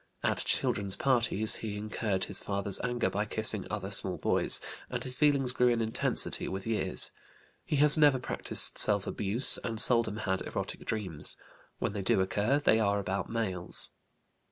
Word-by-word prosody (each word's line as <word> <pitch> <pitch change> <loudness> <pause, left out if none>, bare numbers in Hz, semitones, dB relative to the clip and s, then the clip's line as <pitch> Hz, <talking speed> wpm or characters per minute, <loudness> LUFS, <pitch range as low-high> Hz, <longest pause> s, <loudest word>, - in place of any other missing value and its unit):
At - - -1
children's 100 -1 0
parties 115 -4 -1
he 105 -2 -7
incurred 105 -2 -4
his 100 - +1
father's 100 -1 -3
anger 120 -1 -2
by 105 +2 -3
kissing 105 -2 -3
other 100 -2 -6
small 95 -2 -1
boys, - - 0 0.3
and - - -5
his 130 -1 +1
feelings 140 -3 0
grew 125 0 0
in 120 -1 0
intensity 110 0 +2
with 95 0 -7
years. 115 -1 0 0.5
He - - -4
has 150 +1 +6
never 145 -3 +4
practised 125 - +4
self 100 -2 +4
abuse, 105 +6 +4
and 115 -2 -5
seldom 115 -3 +4
had 95 -3 -3
erotic - - -7
dreams; 95 -9 -5 0.4
when - - -4
they 100 - -5
do 95 - 0
occur 105 +8 -1
they 110 -6 +1
are 100 -2 0
about 95 -1 -5
males. 95 -6 +1
105 Hz, 165 wpm, -28 LUFS, 100-120 Hz, 0.5 s, has